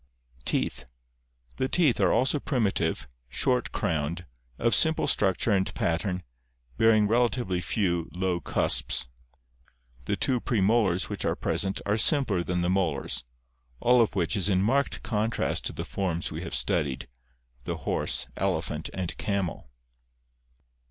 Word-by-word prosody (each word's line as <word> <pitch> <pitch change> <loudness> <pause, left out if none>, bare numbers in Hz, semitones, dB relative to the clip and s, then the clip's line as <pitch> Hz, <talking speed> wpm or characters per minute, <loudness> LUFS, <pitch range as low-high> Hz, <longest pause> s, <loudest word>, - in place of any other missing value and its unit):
Teeth. 65 - -1 0.3
— - - -36
The 130 - 0
teeth 155 -10 +3
are 95 -3 +4
also 130 +5 +3
primitive, 100 - 0 0.2
short 125 - +1
crowned, 80 +2 -2 0.3
of 115 0 +2
simple 160 -1 +3
structure 95 +2 +2
and 95 -2 +2
pattern, 90 +2 -1 0.5
bearing 110 - +4
relatively 115 -5 +1
few, 85 -3 0
low 90 0 -1
cusps. 60 - 0 1.0
The - - 0
two 125 -2 +2
premolars 105 -4 +2
which - - -5
are - - +1
present 95 -1 -1
are 105 +2 +1
simpler 115 - +3
than 90 0 -1
the - - +1
molars, 80 -10 0 0.5
all 125 0 +5
of 110 - +1
which 90 +1 +1
is 100 -1 +1
in 95 -1 +2
marked 135 +6 +1
contrast 110 0 -1
to - - -2
the - - -5
forms 90 -4 -2
we 80 +1 -5
have 85 -6 -4
studied 65 +2 -1 0.3
— - - -37
the - - -3
horse, - - 0
elephant, 80 -4 -1
and 95 -2 -3
camel. 100 - -2
95 Hz, 140 wpm, -27 LUFS, 85-115 Hz, 1.0 s, all